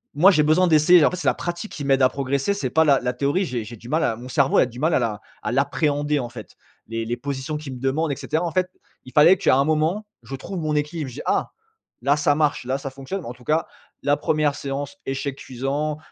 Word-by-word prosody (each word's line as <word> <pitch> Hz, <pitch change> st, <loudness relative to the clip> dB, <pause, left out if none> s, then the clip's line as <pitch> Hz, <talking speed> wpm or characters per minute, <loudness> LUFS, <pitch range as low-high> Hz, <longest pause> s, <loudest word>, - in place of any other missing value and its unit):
moi, 180 Hz, +7 st, +7 dB
j'ai 155 Hz, -, +3 dB
besoin 160 Hz, +5 st, +4 dB
d'essayer, 160 Hz, +1 st, +6 dB
en -, -, +3 dB
fait, 180 Hz, -, -4 dB
c'est 180 Hz, -, -3 dB
la -, -, +3 dB
pratique 175 Hz, +4 st, -5 dB
qui 145 Hz, -, -6 dB
m'aide 135 Hz, -1 st, +3 dB
à 130 Hz, -, +6 dB
progresser, 140 Hz, +7 st, -1 dB
c'est 200 Hz, -, -2 dB
pas 160 Hz, -, +4 dB
la 140 Hz, -3 st, +5 dB
la 125 Hz, 0 st, -2 dB
théorie. 145 Hz, +9 st, 0 dB
J'ai 125 Hz, -7 st, -3 dB
j'ai 115 Hz, +3 st, -9 dB
du 115 Hz, +3 st, -12 dB
mal 160 Hz, +4 st, +1 dB
à 115 Hz, -, +1 dB
mon 120 Hz, +3 st, -10 dB
cerveau 135 Hz, +1 st, +2 dB
a -, -, +6 dB
du 120 Hz, 0 st, -10 dB
mal 160 Hz, +4 st, +1 dB
à -, -, +3 dB
la 110 Hz, -4 st, -2 dB, 0.2 s
à 105 Hz, -, -2 dB
l'appréhender, 145 Hz, +2 st, +1 dB
en 120 Hz, -3 st, -4 dB
fait. 115 Hz, -3 st, -11 dB, 0.3 s
Les 115 Hz, 0 st, -3 dB
les 120 Hz, +2 st, -2 dB
positions 140 Hz, +3 st, -4 dB
qu'il 150 Hz, -3 st, -7 dB
me -, -, -9 dB
demande 140 Hz, +4 st, 0 dB
et -, -, -1 dB
cetera. 160 Hz, +5 st, -2 dB
En 175 Hz, -, -1 dB
fait, 185 Hz, +1 st, 0 dB, 0.4 s
il 130 Hz, -, -13 dB
fallait 170 Hz, +5 st, +7 dB
qu'à 175 Hz, -, +3 dB
un 135 Hz, -, +4 dB
moment, 160 Hz, +7 st, 0 dB, 0.2 s
je 115 Hz, +4 st, -6 dB
trouve 175 Hz, +7 st, -6 dB
mon 155 Hz, -1 st, -1 dB
équilibre. 150 Hz, -1 st, -2 dB
Je 120 Hz, -, -11 dB
dis: -, -, -6 dB
«Ah! -, -, 0 dB, 0.5 s
Là 140 Hz, +3 st, +3 dB
ça 145 Hz, 0 st, +3 dB
marche, 150 Hz, -4 st, 0 dB
là 130 Hz, +2 st, -1 dB
ça 135 Hz, -, -5 dB
fonctionne!» 135 Hz, +9 st, -6 dB
Bon, -, -, -7 dB
en -, -, -6 dB
tout 125 Hz, 0 st, -18 dB
cas, 155 Hz, +5 st, 0 dB, 0.4 s
la 145 Hz, +1 st, +2 dB
1re 150 Hz, -2 st, +1 dB
séance, 140 Hz, 0 st, -5 dB
échec 135 Hz, 0 st, -3 dB
cuisant, 140 Hz, +5 st, -3 dB
145 Hz, 265 wpm, -23 LUFS, 130-155 Hz, 0.5 s, moi